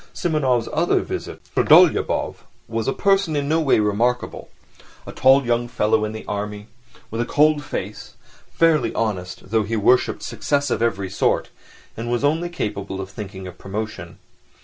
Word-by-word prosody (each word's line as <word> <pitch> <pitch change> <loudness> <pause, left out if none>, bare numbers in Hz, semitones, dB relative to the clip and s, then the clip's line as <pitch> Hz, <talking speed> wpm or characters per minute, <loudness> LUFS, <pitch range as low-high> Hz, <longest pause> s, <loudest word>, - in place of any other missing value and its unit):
Simonov's 135 -8 +1
other - - +2
visitor, - - -6 0.2
Trudolyubov, - - +4 0.3
was 115 0 -3
a - - +2
person 195 -2 +1
in 140 -1 -1
no 160 +2 +2
way 140 -7 +3
remarkable—a 115 +4 -3
tall 135 +1 +4
young 120 0 0
fellow, 110 -2 +1
in 105 - -4
the 110 0 -8
army, 105 0 -4 0.5
with 115 +1 -2
a - - 0
cold 150 0 +3
face, - - -6 0.4
fairly 165 -2 +3
honest, 95 -3 -3
though 110 -1 +3
he 110 +2 -2
worshipped 120 +4 +2
success 140 +4 -1
of - - 0
every 100 -5 -1
sort, - - 0 0.5
and 115 +1 -5
was 120 +2 -1
only 160 +4 +1
capable 100 - -4
of 95 0 -6
thinking 95 -3 -8
of 90 - -10
promotion. 95 -4 -6
115 Hz, 155 wpm, -22 LUFS, 105-140 Hz, 0.5 s, Trudolyubov